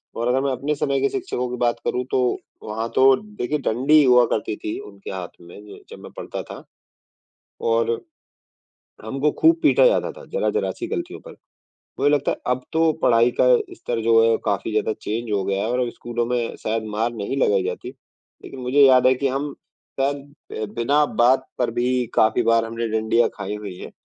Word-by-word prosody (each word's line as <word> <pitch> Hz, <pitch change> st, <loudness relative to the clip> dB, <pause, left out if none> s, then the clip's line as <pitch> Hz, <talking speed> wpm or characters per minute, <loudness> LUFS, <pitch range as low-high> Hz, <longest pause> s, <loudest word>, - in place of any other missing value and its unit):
और 115 Hz, +1 st, -2 dB
अगर 130 Hz, +2 st, +2 dB
मैं 140 Hz, 0 st, 0 dB
अपने 140 Hz, +3 st, -2 dB
समय 140 Hz, -1 st, -1 dB
के 140 Hz, -, +2 dB
शिक्षकों 125 Hz, 0 st, -3 dB
की 125 Hz, -, -4 dB
बात 120 Hz, -1 st, +1 dB
करूँ 125 Hz, -, -1 dB
तो -, -, +2 dB, 0.4 s
वहाँ 110 Hz, +2 st, -4 dB
तो 135 Hz, 0 st, +6 dB, 0.2 s
देखिए 150 Hz, +5 st, -1 dB
डंडी 140 Hz, +6 st, +4 dB
हुआ 125 Hz, -2 st, +6 dB
करती 105 Hz, 0 st, -1 dB
थी 105 Hz, -, -3 dB
उनके 100 Hz, -1 st, -10 dB
हाथ 95 Hz, -2 st, -5 dB
में 85 Hz, +3 st, -13 dB
ज -, -, -12 dB
जब -, -, -10 dB
मैं -, -, -10 dB
पढ़ता -, -, -5 dB
था -, -, -10 dB, 1.1 s
और 115 Hz, 0 st, +2 dB, 1.1 s
हमको 135 Hz, +6 st, 0 dB
खूब 330 Hz, +1 st, +6 dB
पीटा -, -, +5 dB
जाता -, -, +2 dB
था -, -, -13 dB
जरा-जरा 470 Hz, -1 st, 0 dB
सी 350 Hz, -, -4 dB
गलतियों 345 Hz, +1 st, -5 dB
पर। -, -, -9 dB, 0.7 s
मुझे 145 Hz, -, +4 dB
लगता 145 Hz, -, 0 dB
है -, -, -2 dB
अब 125 Hz, 0 st, 0 dB
तो 160 Hz, 0 st, +3 dB
पढ़ाई 115 Hz, +1 st, +4 dB
का -, -, +5 dB, 0.3 s
स्तर 120 Hz, -, -4 dB
जो 115 Hz, 0 st, +5 dB
है, 115 Hz, -, +3 dB
काफ़ी 100 Hz, +2 st, -1 dB
ज़्यादा 110 Hz, 0 st, 0 dB
चेंज 115 Hz, +1 st, -3 dB
हो 100 Hz, -2 st, +1 dB
गया 100 Hz, +1 st, -1 dB
है 115 Hz, -, -2 dB
और 125 Hz, -, 0 dB
अब 125 Hz, -, 0 dB
स्कूलों 120 Hz, 0 st, -3 dB
में 120 Hz, -1 st, -2 dB
शायद 110 Hz, 0 st, -1 dB
मार 115 Hz, +3 st, 0 dB
नहीं 110 Hz, +5 st, -4 dB
लगाई 100 Hz, -7 st, +2 dB
जाती, 90 Hz, +6 st, -4 dB, 0.6 s
लेकिन 135 Hz, -, -9 dB
मुझे 130 Hz, +3 st, +3 dB
याद 130 Hz, -1 st, +5 dB
है 130 Hz, -, +5 dB
कि 135 Hz, +2 st, -1 dB
हम 140 Hz, +2 st, -3 dB, 0.5 s
शायद 140 Hz, +1 st, +1 dB, 0.5 s
अ, -, -, 0 dB
बिना 140 Hz, +6 st, +2 dB, 0.2 s
बात 130 Hz, +2 st, +4 dB
पर 125 Hz, -2 st, +1 dB
भी 125 Hz, 0 st, +1 dB
काफ़ी 110 Hz, +2 st, +3 dB
बार 115 Hz, 0 st, +3 dB
हमने 115 Hz, 0 st, -4 dB
डंडियाँ 110 Hz, +2 st, +2 dB
खाई 105 Hz, -, -5 dB
हुई 100 Hz, -3 st, -7 dB
हैं, -, -, -9 dB
120 Hz, 200 wpm, -22 LUFS, 110-135 Hz, 1.1 s, तो